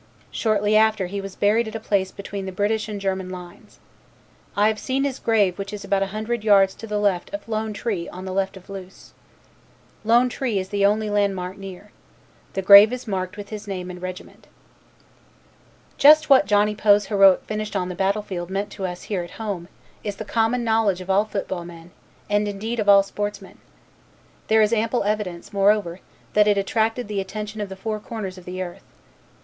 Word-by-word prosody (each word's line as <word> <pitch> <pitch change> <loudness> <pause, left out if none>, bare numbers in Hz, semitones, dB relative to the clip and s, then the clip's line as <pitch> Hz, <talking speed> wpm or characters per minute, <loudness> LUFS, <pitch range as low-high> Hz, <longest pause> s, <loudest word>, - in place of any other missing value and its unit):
Shortly 210 -1 +1
after 215 -2 +3
he 200 +3 -4
was 195 -1 -8
buried 220 +3 +2
at 220 - -7
a - - -2
place 200 -3 0
between 200 -1 -6
the - - -4
British 215 +3 -1
and 205 -1 -4
German 190 -1 -2
lines. 180 -1 -11 0.8
I 205 +1 +4
have 215 -1 0
seen 265 +5 -1
his 275 -2 -2
grave 205 -5 +2
which 195 0 -5
is 210 -1 -7
about 195 -1 0
a 195 - +1
hundred 215 +3 -3
yards 195 -3 +5
to 225 - -10
the 210 -1 -2
left 200 -4 0
of 300 - -9
'Lone 220 -1 -2
Tree' 205 -5 -3
on 185 +1 -9
the 190 - -4
left 195 0 -1
of 185 - -15
Loos. 190 -1 -11 0.9
'Lone 235 +3 +4
Tree' 245 -3 -2
is 190 0 -3
the 200 -1 0
only 210 +1 +2
landmark 195 -3 0
near. 195 +1 -10 0.6
The 195 - -2
grave 200 +3 +9
is 250 -1 -6
marked 185 -1 -3
with 205 -1 -8
his 215 -1 -7
name 185 -2 -5
and 180 0 -10
regiment. 185 0 -8 1.5
Just 305 +1 +7
what 260 -8 +6
Johnny 210 +1 +3
Poe's 205 -1 +4
heroic 195 -2 +5
finish 215 -1 -4
on 185 -2 0
the - - -4
battle 195 +3 0
field 175 -3 -5
meant 200 +2 -3
to 190 - -4
us 180 0 -7
here 195 -4 -2
at 175 - -8
home 200 -6 -4 0.4
is 205 -2 -4
the 220 - -7
common 230 +3 +1
knowledge 220 -5 +1
of 185 +1 -3
all 200 +2 +3
football 195 -4 -4
men 170 0 -12 0.4
and 205 0 +1
indeed 220 +4 -4
of 205 -1 +1
all 200 -1 +8
sportsmen. 205 +1 -6 0.9
There 220 0 +5
is 210 +2 +1
ample 230 +1 +1
evidence, 205 -4 -3
moreover, 200 -3 +2 0.3
that 210 0 +4
it 205 -1 +3
attracted 220 +4 0
the 205 -2 -2
attention 210 +2 -6
of 205 - -4
the 190 - -7
four 215 +2 -4
corners 205 -4 -6
of 180 - -16
the 185 +1 -4
earth. 175 -1 -10
205 Hz, 200 wpm, -23 LUFS, 190-215 Hz, 1.5 s, grave